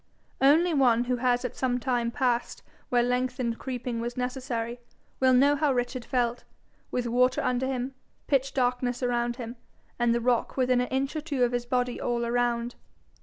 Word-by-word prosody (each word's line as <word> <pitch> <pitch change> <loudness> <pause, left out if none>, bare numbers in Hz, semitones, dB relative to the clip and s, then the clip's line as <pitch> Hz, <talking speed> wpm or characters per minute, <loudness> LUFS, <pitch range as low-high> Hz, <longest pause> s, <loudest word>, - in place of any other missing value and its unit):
Only 320 +6 +5
one 245 -5 +4
who 250 0 -1
has 245 0 +1
at 250 - -4
some 250 -1 0
time 240 -2 0
passed 245 -1 -1 0.3
where 245 -1 +3
lengthened 250 -1 -1
creeping 245 -2 -4
was 240 +1 -4
necessary, 250 -2 -3 0.4
will 260 0 +4
know 275 +3 +5
how 295 -1 +2
Richard 245 -1 -2
felt, 240 -1 0 0.5
with 250 -1 -2
water 250 +2 +2
under 250 +1 0
him, 260 0 -3 0.3
pitch 275 -1 +1
darkness 250 -1 0
about 240 -1 0
him, 240 -1 -7 0.4
and 240 -1 +3
the 235 - +2
rock 240 +1 0
within 255 -1 +3
an 250 - -1
inch 270 +3 -1
or 310 - -2
two 290 -5 -1
of 245 - +2
his 245 0 -2
body 250 -1 -1
all 235 -1 -1
round. 240 0 0
250 Hz, 175 wpm, -27 LUFS, 240-260 Hz, 0.5 s, Only